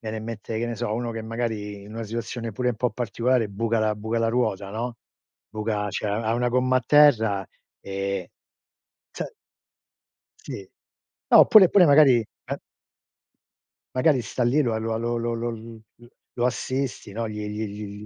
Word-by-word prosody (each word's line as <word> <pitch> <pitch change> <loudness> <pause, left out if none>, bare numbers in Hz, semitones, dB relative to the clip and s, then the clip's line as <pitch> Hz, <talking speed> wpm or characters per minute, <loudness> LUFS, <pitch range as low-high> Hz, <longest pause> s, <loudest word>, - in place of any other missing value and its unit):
viene 110 - -4
in 110 - -6
mente, 110 -1 -5
che 120 - -1
ne 120 - -3
so, 115 -1 -3
uno 120 +1 -2
che 115 -1 -5
magari 110 -3 -4
in 105 +2 -11
una 115 - -4
situazione 115 +1 -4
pure 125 +4 -1
un - - -3
po' 125 +2 0
particolare 120 0 0
buca 115 +3 -1
la 110 0 +1
buca 110 +2 -2
la 115 - +1
ruota, 105 -5 -1
no. 115 +3 -4 0.5
Buca 105 -1 -2
cioè, 105 - -3
ha 110 +2 0
1 120 +1 +1
gomma 125 +1 +2
a - - -7
terra 110 -10 +5 0.3
e 95 -1 -4 0.8
se - - -6 1.1
Sì, 95 -2 -8 0.6
no - - +8
oppure 200 -5 +8
pure 190 -3 +6
magari 145 -3 +7
eh 110 - -7 1.4
magari 130 +1 +3
sta 120 +2 -3
lì 135 +6 +3
la 115 -4 0
lo 110 0 -2
lo 120 +1 -1
lo 115 0 -2
l 115 0 -9 0.6
lo 120 - +1
assisti, 130 -2 -3
no, 115 +2 -3
gli 105 0 -5
gli 105 +1 -3
gli 105 0 -8
115 Hz, 170 wpm, -25 LUFS, 105-120 Hz, 1.4 s, no